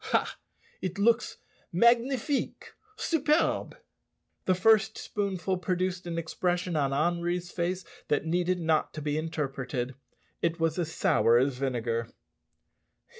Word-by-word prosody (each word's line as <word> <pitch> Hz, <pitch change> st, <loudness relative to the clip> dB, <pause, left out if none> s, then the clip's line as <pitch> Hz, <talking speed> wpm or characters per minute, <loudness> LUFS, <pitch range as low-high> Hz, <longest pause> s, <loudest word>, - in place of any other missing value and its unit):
Ha! -, -, +1 dB, 0.5 s
it 185 Hz, +1 st, -3 dB
looks 230 Hz, +3 st, +2 dB, 0.3 s
magnifique 240 Hz, -, +2 dB, 0.2 s
superb!" 320 Hz, -6 st, +1 dB, 0.7 s
The 185 Hz, -, +3 dB
first 220 Hz, +2 st, +4 dB
spoonful 190 Hz, -3 st, -2 dB
produced 180 Hz, +1 st, -1 dB
an 170 Hz, -1 st, -3 dB
expression 175 Hz, +1 st, -1 dB
on 140 Hz, -3 st, +1 dB
Henri's 175 Hz, +4 st, 0 dB
face 180 Hz, +1 st, -2 dB, 0.2 s
that 145 Hz, +1 st, +1 dB
needed 180 Hz, +2 st, +1 dB
not 160 Hz, -2 st, +1 dB
to 155 Hz, -, -4 dB
be 145 Hz, 0 st, -1 dB
interpreted. 135 Hz, -5 st, -3 dB, 0.5 s
It 170 Hz, 0 st, 0 dB
was 165 Hz, +1 st, +1 dB
as 165 Hz, -2 st, -1 dB
sour 115 Hz, -6 st, +3 dB
as 130 Hz, 0 st, +1 dB
vinegar. 115 Hz, -3 st, -1 dB
175 Hz, 120 wpm, -29 LUFS, 155-185 Hz, 0.7 s, first